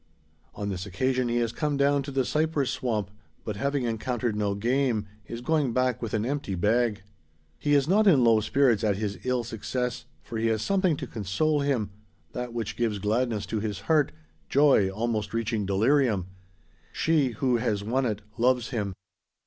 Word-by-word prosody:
On 100 0 -3
this 95 0 -4
occasion 130 +6 0
he 120 - 0
has 115 -1 +1
come 150 +2 -1
down 140 0 +3
to 140 - -6
the 135 -2 0
cypress 155 -2 0
swamp; 105 -6 -2 0.3
but, 105 - -3
having 140 +5 -1
encountered 120 0 -1
no 105 -1 0
game, 120 0 +1 0.2
is 115 0 -6
going 145 -3 +1
back 130 -1 +1
with 115 -2 -2
an 110 0 0
empty 135 -7 -2
bag. 105 +3 +1 0.6
He 145 - +2
is 140 -1 +3
not 210 +4 +4
in 145 -10 +6
low 115 -2 +5
spirits 120 -1 +2
at 105 -2 +2
his 105 0 -3
ill 125 -1 +1
success; 125 +2 -3 0.2
for 115 -2 -5
he 115 - +1
has 110 -1 0
something 190 -6 +2
to - - -4
console 120 +9 0
him 135 -8 0 0.4
that 125 0 -4
which 115 -2 -4
gives 115 -3 0
gladness 110 +2 0
to 110 - -2
his 105 -4 -3
heart 155 -3 +2 0.4
joy 140 -9 +4
almost 110 +1 -2
reaching 110 -3 -1
delirium. 110 0 +2 0.7
She, 150 -6 +1
who 125 +2 +1
has 110 -4 -1
won 125 +4 0
it, 105 -2 -3 0.2
loves 125 -1 +2
him. 100 -6 -2
120 Hz, 180 wpm, -27 LUFS, 105-135 Hz, 0.7 s, in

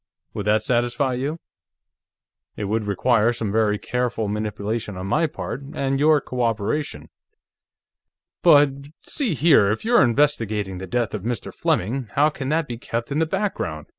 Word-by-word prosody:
Would 105 - -4
that 105 0 +3
satisfy 125 +3 0
you? 140 +6 -3 1.2
It - - -3
would 105 +2 -1
require 115 +3 +2
some 110 -3 -3
very 105 -1 +2
careful 120 -2 -2
manipulation 105 0 -3
on 95 - -5
my 160 +11 +1
part, 145 -2 -6
and 135 0 0
your 150 +1 +5
cooperation." 115 - -2 1.3
"But.... 145 -1 +6 0.3
See 245 - -2
here, 140 -9 +5
if 110 - -2
you're 240 +1 +5
investigating 115 -8 +1
the 95 - -7
death 120 +4 -1
of 105 - -3
Mr. 115 +1 -4
Fleming, 120 +6 -1
how 150 +2 +4
can 135 -3 -5
that 160 0 +1
be 120 -2 -6
kept 115 +1 -4
in 145 - 0
the 160 - +2
background?" 155 - -3
120 Hz, 155 wpm, -23 LUFS, 105-145 Hz, 1.3 s, But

